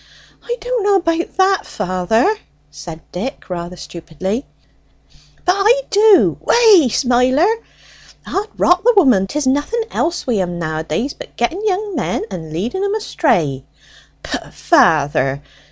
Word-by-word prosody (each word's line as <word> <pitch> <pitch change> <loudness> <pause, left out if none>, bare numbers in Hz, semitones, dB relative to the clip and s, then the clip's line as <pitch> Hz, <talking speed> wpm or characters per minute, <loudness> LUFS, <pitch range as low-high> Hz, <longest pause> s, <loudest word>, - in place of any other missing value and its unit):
"I 480 0 -4
don't - - -2
know 405 0 +3
about 335 -2 -1
that, 385 0 +2
father," 205 - 0 0.4
said 160 +2 -9
Dick 210 +2 -6
rather 175 0 -5
stupidly. 180 - -5 1.0
"But 360 - +4
I 445 +6 +3
do 415 -1 +5
Wey, 420 - +5
Smiler! 255 +5 +2 0.8
'Od 405 +2 -2
rot 355 +1 +3
the 485 0 +4
women, 245 - +4
'tis 295 +6 -2
nothing 290 - 0
else 345 +1 -1
wi' 245 -4 0
'em 175 -2 -2
nowadays 160 - -3
but - - -12
getting 320 +12 -1
young 410 -1 -1
men 255 - -2
and 165 -4 -7
leading 230 - -3
'em 400 +1 0
astray." 165 - 0 0.6
"Pooh, - - -5
father! 145 - +2
260 Hz, 135 wpm, -17 LUFS, -, 1.0 s, do